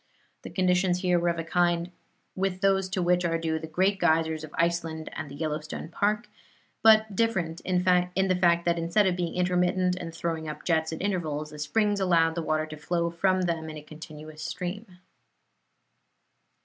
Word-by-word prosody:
The - - -8
conditions 180 -1 +1
here 180 -2 +2
were 175 0 +1
of 170 - -1
a 165 - -2
kind 175 +1 +1 0.4
with 190 -1 -2
those 195 -1 +2
to 185 -1 -1
which 180 0 +2
are 165 -1 +1
due 160 -1 -1
the 160 - -7
great 190 +5 +1
geysers 160 -2 +2
of 155 - -7
Iceland 165 -2 -1
and 145 -1 -6
the 140 - -9
Yellowstone 155 0 -4
Park, 210 +6 0 0.5
but 220 -2 +5
different 185 -8 0
in 180 -1 0
the 180 +1 +2
fact 170 -1 +3
that 170 -1 +1
instead 170 +5 +2
of 185 -2 +2
being 175 -2 -3
intermittent 180 0 +1
and 170 -2 -6
throwing 165 -1 -3
up 150 0 -8
jets 160 -2 +1
at 160 - -5
intervals, 155 -7 -2
the 150 - -10
springs 205 +7 +1
allowed 165 -4 +3
the 170 - -3
water 155 -1 0
to 155 0 -9
flow 170 +2 -1
from 185 +2 +1
them 165 -2 -2
in 155 - -7
a 150 - -9
continuous 155 0 -10
stream. 180 +6 -5
170 Hz, 185 wpm, -27 LUFS, 160-185 Hz, 0.5 s, but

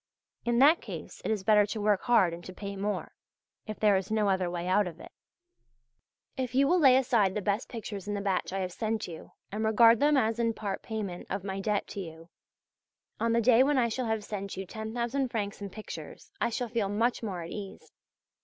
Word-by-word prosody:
In 240 0 +1
that 295 +6 +6
case - - -8
it - - -2
is 215 -3 -1
better 210 +1 +5
to 215 +1 -4
work 205 -2 +2
hard 200 -8 +3
and 170 +1 -8
to 185 - -8
pay 200 0 -6
more, 205 +1 -3 0.5
if 215 - -6
there 210 -2 +4
is 190 0 -1
no 215 -2 +2
other 190 -2 +1
way 175 0 -4
out 190 +1 +3
of 170 -1 -8
it. - - -11 1.2
If 255 -1 -3
you 275 +1 +4
will 360 +3 +4
lay 265 -5 +7
aside 235 -7 +2
the - - 0
best 205 +4 -1
pictures 205 -4 -6
in 205 - -2
the - - -2
batch 195 -3 -1
I 195 0 -2
have 185 -1 -3
sent 220 +3 -2
you 165 -2 -10 0.2
and 215 +2 -2
regard 230 +1 +6
them 295 0 +4
as 225 -2 +1
in 230 -1 +1
part 200 -2 -4
payment 205 -6 -5
of 195 0 -3
my 195 -1 -4
debt 205 0 0
to - - -6
you, 165 -2 -9 0.9
on 230 0 +1
the 235 - +3
day 235 +1 +5
when 285 +1 +3
I 235 -2 +3
shall 245 +2 -2
have 220 -1 -1
sent 200 -2 -5
you 190 - -4
10,000 235 +6 -2
francs 205 -3 -3
in 200 - -5
pictures, 215 - -9
I - - +2
shall 245 +1 -2
feel 225 -4 -1
much 230 +4 0
more 190 -6 -4
at 165 - -8
ease. 200 -2 -8
210 Hz, 225 wpm, -29 LUFS, 195-235 Hz, 1.2 s, lay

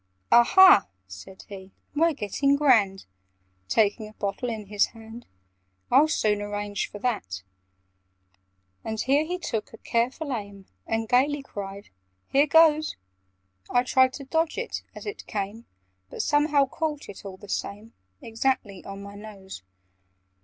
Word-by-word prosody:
"Aha," 305 - +7 0.2
said 95 - -12
he, 190 -2 -10 0.3
"we're 330 +2 +3
getting 275 +5 +1
grand!" 225 -10 +3 0.6
(Taking 215 0 +1
a - - -17
bottle 205 +4 -3
in 220 -2 -5
his 205 0 +1
hand) 225 +2 -11 0.6
"I'll 280 +5 +6
soon 210 -8 +1
arrange 205 0 -3
for - - -9
that!" 200 - -3 1.4
And 220 0 -4
here 275 +6 +2
he 355 +3 -3
took 225 -11 -4
a - - -10
careful 255 +7 -1
aim, 200 -4 -7 0.2
And 225 0 -1
gaily 275 +4 +2
cried 200 -4 -8 0.4
"Here 280 +2 +4
goes!" 310 0 +4 0.7
I 245 - +3
tried 260 0 +3
to 280 - -7
dodge 320 +3 0
it 470 - -4
as - - -9
it 415 0 -7
came, 210 +3 -5 0.4
But - - -4
somehow 290 -1 +3
caught 300 +1 -4
it, 200 - -10
all 195 -2 -8
the 205 - -13
same, 205 +3 -5 0.3
Exactly 225 -4 -2
on 195 0 -8
my 200 0 -10
nose. 200 - -10
225 Hz, 140 wpm, -26 LUFS, 205-280 Hz, 1.4 s, Aha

